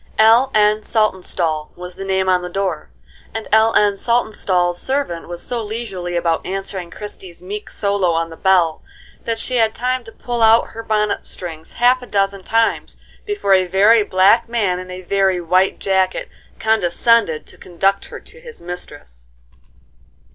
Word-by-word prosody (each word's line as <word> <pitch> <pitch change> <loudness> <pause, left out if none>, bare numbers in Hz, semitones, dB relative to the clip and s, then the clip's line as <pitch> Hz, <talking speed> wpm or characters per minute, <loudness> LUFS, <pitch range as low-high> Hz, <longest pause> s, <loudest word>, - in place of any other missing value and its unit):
"L. 230 +4 +5
N. 210 0 +3
Saltonstall" 180 -8 -1
was 180 0 -8
the 195 - -8
name 190 -1 0
on 185 -1 +3
the 180 - -6
door, 185 -4 -3 0.5
and 225 - -4
L. 220 +1 +5
N. 205 -1 +4
Saltonstall's 190 -7 0
servant 265 -11 -2
was 175 0 -8
so 240 -2 -3
leisurely 205 -5 -5
about 170 -1 0
answering 190 -1 -5
Christie's 190 -3 -8
meek 205 +3 -6
solo 200 -3 0
on 165 0 -1
the - - -9
bell, 175 -3 +2 0.4
that 230 -1 -1
she 250 +2 -2
had 220 -1 +2
time 255 +1 -1
to 225 - -11
pull 240 0 -4
out 225 +1 +5
her 225 - -8
bonnet 210 -2 -1
strings 160 -3 -5
half 250 +1 +3
a 250 - -10
dozen 195 -1 0
times 225 +3 0 0.3
before 410 - +1
a 185 -1 +3
very 205 +5 +5
black 200 +4 +3
man 205 -6 0
in 185 0 -9
a 185 0 -7
very 190 0 +1
white 185 +3 +1
jacket 190 -1 0 0.3
condescended 220 -3 +2
to - - -15
conduct 195 +3 -1
her - - -9
to 480 - -17
his 480 -1 -12
mistress. 145 - -8
195 Hz, 165 wpm, -19 LUFS, 180-225 Hz, 0.5 s, L